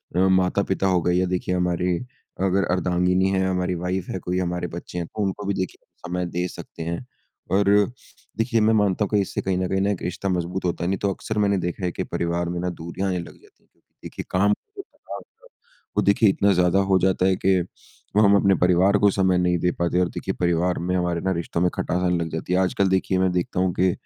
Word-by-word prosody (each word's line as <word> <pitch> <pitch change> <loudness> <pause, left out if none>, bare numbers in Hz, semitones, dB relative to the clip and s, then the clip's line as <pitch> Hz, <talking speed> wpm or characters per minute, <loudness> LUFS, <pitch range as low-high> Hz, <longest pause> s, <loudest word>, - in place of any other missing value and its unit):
अ, - - +2
माता-पिता 95 +1 +1
हो 90 -2 +2
गए 90 - +2
या 90 +1 +2
देखिए 90 0 -1
हमारी 90 0 0 0.5
अगर 95 +1 +2
अर्धांगिनी 90 +1 +2
है, 95 -1 +1
हमारी 90 -1 0
वाइफ 90 +1 -3
है, 95 - -3
कोई 90 +1 -3
हमारे 90 -1 -2
बच्चे 85 0 -7
हैं 85 -2 -3
तो 105 - -6
उनको 100 +1 -3
भी 100 - +1
देखिए 95 -1 -3 0.3
समय 90 0 -2
दे 90 +1 -2
सकते 80 - -9
हैं। 85 +9 -4 0.5
और 100 +1 +3 0.7
देखिए, 115 0 +1
मैं 110 +1 +4
मानता 105 -1 +2
हूँ - - -7
कि - - +4
इससे 95 - -3
कहीं 95 -1 -1
न 90 0 0
कहीं 95 0 +1
ना 100 - +1
एक 100 - -4
रिश्ता 95 +2 -3
मज़बूत 90 +1 -2
होता 85 0 -1
है - - 0
नहीं 95 - 0
तो 100 - 0
अक्सर 110 +3 -5
मैंने 100 -1 +2
देखा 90 +2 -3
है 90 - 0
कि - - -3
परिवार 85 0 -2
में 85 0 -3
ना 90 - -1
दूरियाँ 85 +3 -4
आने 90 - -1
लग 85 - -10
जाती - - -25
हैं। - - -37 0.3
देखिए - - -7
काम 100 +3 +3
का 415 - -11
जो - - -4
दबाव - - -10 0.8
वो - - +5
देखिए 100 +2 +4
इतना 100 +1 +3
ज़्यादा 90 +1 +3
हो 95 - +5
जाता 95 0 +2
है 95 0 +3
कि, 95 0 +2 0.6
वो 105 - +5
हम 100 0 +6
अपने 100 -1 +4
परिवार 90 +3 +4
को 100 - +5
समय 95 -1 +2
नहीं 90 0 +2
दे 90 +1 +1
पाते 85 +1 +1
और 90 - +2
देखिए - - -4
परिवार 85 0 +1
में 90 +2 -1
हमारे 90 -2 0
ना 95 - 0
रिश्तो 85 0 -3
में 90 - +3
खटास 90 - -1
आने 90 -1 +2
लग 85 -1 -2
जाती 80 +2 -3
है। 90 - +3
आजकल 95 +1 +1
देखिए, 95 0 +1
मैं 95 -1 +2
देखता 90 0 -1
हूँ 95 -1 +1
कि 90 0 +4
90 Hz, 240 wpm, -23 LUFS, 90-95 Hz, 0.8 s, हम